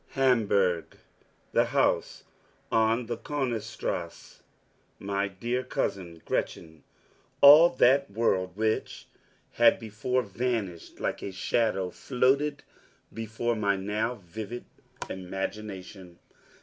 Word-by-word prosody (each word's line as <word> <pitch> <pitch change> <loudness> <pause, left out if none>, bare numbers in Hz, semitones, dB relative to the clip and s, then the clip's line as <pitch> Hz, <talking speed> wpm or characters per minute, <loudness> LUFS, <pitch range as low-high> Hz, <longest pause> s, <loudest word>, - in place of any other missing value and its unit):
Hamburg, 105 -10 +2 0.5
the - - +3
house - - 0 0.5
on 115 +2 +2
the - - -4
Konigstrasse, 110 - -4 0.6
my 100 0 -2
dear 120 +6 -3
cousin 90 -9 -3
Gretchen 80 -2 -3 0.6
all 150 +4 +9
that 135 +1 +3
world 95 -4 0
which 110 0 -1 0.5
had 115 -1 +5
before 115 +3 -2
vanished 105 -5 -3
like - - -2
a 100 - -5
shadow 95 -1 0
floated 140 +5 0 0.5
before 115 +1 -2
my 100 -2 +1
now 105 +5 -2
vivid 110 +4 -8 0.4
imagination. 95 -1 -6
110 Hz, 95 wpm, -28 LUFS, 95-120 Hz, 0.6 s, all